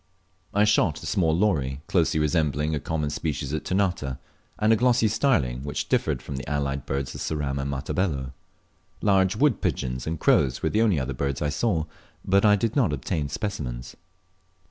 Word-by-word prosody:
I 105 - +3
shot 100 -7 +2
a - - -7
small 85 -6 +1
lory 70 -9 0
closely 80 -3 +1
resembling 75 -1 +1
a 75 - 0
common 75 -1 -2
species 75 -2 -3
at 80 - -2
Ternate, 90 -9 -1 0.4
and 110 +1 +3
a - - +5
glossy 120 -1 +3
starling 80 - +1
which 70 0 -4
differed - - 0
from 70 - -5
the 65 -1 -6
allied 70 -2 -2
birds 70 0 -2
of - - -7
Ceram 75 -3 -2
and 70 - -3
Matabello. 70 -1 -2 0.7
Large 95 -2 +3
wood 135 -2 +2
pigeons 65 +1 -2
and 80 -1 -2
crows 65 -2 +2
were 80 - +2
the 110 - +2
only 105 -9 +3
other 65 +1 -3
birds 70 +1 -2
I 75 - 0
saw, 80 0 0 0.4
but 100 +1 +3
I 105 -1 +6
did 115 +3 -1
not 120 - +3
obtain 75 +1 -2
specimens. 70 - -4
75 Hz, 180 wpm, -25 LUFS, 70-100 Hz, 0.7 s, I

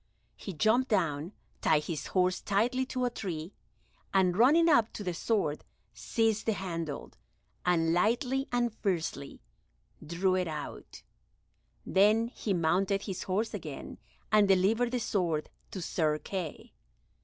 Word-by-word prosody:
He 195 - -7
jumped 220 - +2
down, 165 - 0 0.3
tied 155 -1 +3
his 155 -1 -4
horse 185 -1 +1
tightly 245 +6 +1
to 255 -1 -1
a 245 - 0
tree, 175 -5 -5 0.6
and, 185 -2 +3
running 295 - +5
up 235 -9 +4
to 205 - -6
the 180 -2 -2
sword, 165 -5 -1 0.3
seized 225 -2 0
the 220 - +3
handle, 165 -7 -5 0.6
and 165 -2 +3
lightly 245 - +1
and 240 -2 +1
fiercely 165 -9 -3 0.6
drew 175 +4 0
it 185 -1 0
out; 155 -2 -7 0.8
then 215 +4 +3
he 220 - -4
mounted 190 +3 +1
his 190 -4 -5
horse 205 +4 -1
again, - - -7 0.3
and 210 -1 +5
delivered 200 +6 +3
the 250 0 -1
sword 175 -9 -1 0.2
to 185 - -6
Sir 155 -3 0
Kay. 175 -1 -6
195 Hz, 135 wpm, -30 LUFS, 170-225 Hz, 0.8 s, running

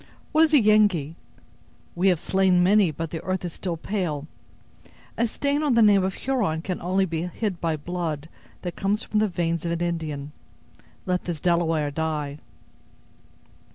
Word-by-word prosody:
What 315 0 +5
is 310 - -2
a - - +8
Yengee? 205 - +3 0.8
we 180 +3 +1
have 180 -4 +2
slain 190 -1 +3
many, 200 0 +5
but 160 +1 -5
the 165 - -5
earth 185 -1 -2
is 170 - -5
still 175 -3 -4
pale. 165 -6 -3 0.9
A 235 - +1
stain 280 +5 -1
on 290 -5 +2
the 230 - +6
name 200 -2 +5
of 190 0 -1
Huron 210 -12 -1
can 180 -1 -4
only 190 +2 +1
be 165 -3 -3
hid 190 0 -3
by 165 -2 0
blood 160 -2 -4 0.4
that 175 -2 -4
comes 205 +2 0
from 215 - 0
the 215 - +3
veins 170 -3 -1
of 170 - -2
an 170 0 -2
Indian. 155 -4 -3 0.7
Let 180 -1 -1
this 170 -3 -3
Delaware 165 -3 +1
die." 150 -1 -3
175 Hz, 170 wpm, -25 LUFS, 160-200 Hz, 0.9 s, a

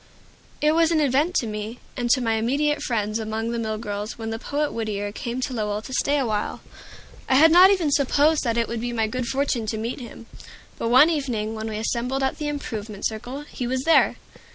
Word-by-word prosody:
It 300 +1 +4
was 325 0 +3
an 330 -2 +2
event 295 +5 +2
to 250 - +2
me, 215 +2 -5 0.2
and 240 -1 -2
to 255 +1 +4
my 225 -2 +1
immediate 285 +7 0
friends 215 -2 -1
among 220 +1 -3
the 235 - -2
mill 220 -1 -2
girls, 210 0 -5
when 225 -1 -5
the 225 - -4
poet 290 +4 -2
Whittier 205 -3 -3
came 235 +4 -4
to 255 - -2
Lowell 210 -2 -2
to 260 - -8
stay 285 +3 +1
awhile. 220 -6 -1 0.7
I 260 - +4
had 315 +4 +7
not 360 +3 +8 0.2
supposed 290 +2 +3
that 235 -2 0
it 235 - +1
would 235 -1 -4
be 240 0 -3
my 225 -1 +1
good 245 +2 -3
fortune 265 -4 -1
to 220 - -2
meet 230 +5 -4
him; 235 -2 -10 0.5
but 230 - -1
one 265 +7 +7
evening 240 -8 -2
when 220 0 -4
we 215 - -4
assembled 245 +4 -1
at 265 - -1
the 300 - -2
"Improvement 220 -8 -5
Circle," 245 +6 -4
he 260 -4 -6
was 260 +1 -1
there. 325 +2 +4
235 Hz, 215 wpm, -24 LUFS, 220-280 Hz, 0.7 s, not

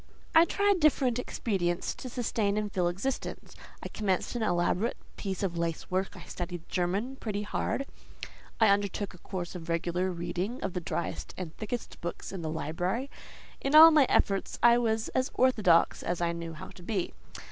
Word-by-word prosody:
I 325 0 +8
tried 405 +1 +2
different 270 -6 +3
expedients 185 -8 -1
to 255 - -8
sustain 220 -4 0
and 210 -1 -1
fill 180 -3 +1
existence: 195 +10 -4 0.3
I - - -3
commenced 195 +1 -1
an 240 - -2
elaborate 180 +2 +1 0.2
piece 195 -1 -4
of 175 -3 -1
lace 165 0 -3
work, 190 +1 0
I - - -9
studied 175 -1 -6
German 200 +9 -1
pretty 210 -4 -3
hard, 270 +5 -2 0.7
I 220 -2 +6
undertook 200 0 0
a 180 - -14
course 180 -2 -5
of 170 -2 -8
regular 175 +2 0
reading 175 +7 -3
of 195 - -2
the 180 - -2
driest 170 - -4
and 175 -4 -6
thickest 225 +2 -5
books 170 - -5
in 190 -3 -5
the 160 - -3
library; 175 - -2 0.5
in 275 +2 +1
all 320 +1 +11
my 300 -4 +5
efforts 195 -1 +1
I 240 0 +7
was 220 -2 0
as 260 0 0
orthodox 215 -10 +4
as 175 0 -2
I 170 -1 +1
knew 170 -1 -5
how 155 - -9
to - - -14
be. 185 -1 -2
195 Hz, 180 wpm, -29 LUFS, 175-235 Hz, 0.7 s, all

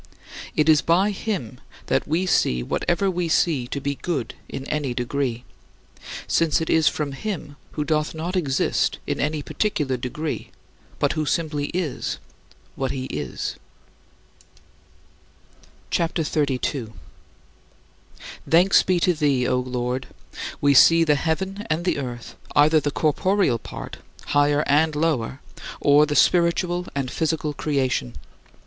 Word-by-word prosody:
" - - -11
It 150 - +2
is 155 -2 +6
by 185 +5 +3
him 185 - -4 0.3
that - - 0
we 165 +5 +1
see 60 - +2
whatever 175 - 0
we 175 -2 -2
see 150 -6 +2
to 140 - -4
be 140 +1 -2
good 140 -3 -3 0.2
in 135 - -6
any 145 -4 -2
degree, 125 -1 -2 0.8
since 165 -2 +2
it 160 - -2
is 160 -2 +4
from 150 -2 0
him, 150 -1 -5 0.2
who 150 - -1
doth 155 +1 0
not 170 +4 -3
exist 145 -7 +1
in - - -2
any 150 +1 -1
particular 150 -12 -1
degree 150 +6 -4 0.5
but - - +1
who 155 -1 -2
simply 150 -3 -1
is 175 -6 -3 0.6
what 135 -1 -2
he 130 0 -3
is. - - -4 2.3
CHAPTER 170 0 0
XXXII 145 -3 0
47. 120 -3 -3 1.6
Thanks 175 +4 +6
be 185 -1 +1
to 180 - +3
thee, 140 -5 +1
O 125 - +2
Lord! 125 0 -3 0.5
We 145 0 +4
see 165 +5 +7
the 155 -2 +3
heaven 190 +7 -2
and 165 +2 -1
the 180 - +1
earth, 120 -3 -6 0.2
either 155 +2 +5
the 145 - -1
corporeal 155 - +1
part - - -8 0.3
higher 145 +1 +3
and 150 +2 +3
lower 145 -5 -1 0.4
or 145 +1 +5
the 145 - -2
spiritual 175 +1 +2
and 135 -3 -2
physical 155 -2 -1
creation. 130 - -1
150 Hz, 140 wpm, -23 LUFS, 135-165 Hz, 2.3 s, see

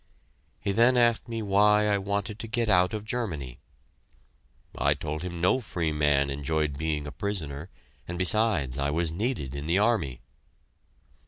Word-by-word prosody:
He 100 - -1
then 120 +5 +4
asked 120 -2 +3
me 115 -1 -3
why 105 +1 +4
I 100 -1 +2
wanted 100 +1 -3
to 115 - -5
get 115 0 -1
out 90 +1 +3
of 105 0 -5
Germany. 80 - -4 1.2
I 70 +1 +2
told 75 +1 -4
him 85 -1 -5
no 90 +9 +3
free 85 -8 -2
man 75 -2 +2
enjoyed 75 +1 -1
being 75 0 -2
a 75 - -6
prisoner, 85 -5 -4 0.4
and 85 - -5
besides, 85 - +2
I 70 +1 0
was 80 +2 0
needed 95 - -2
in 70 +1 -5
the 85 +3 +2
army. 100 - +1
90 Hz, 160 wpm, -27 LUFS, 75-105 Hz, 1.2 s, then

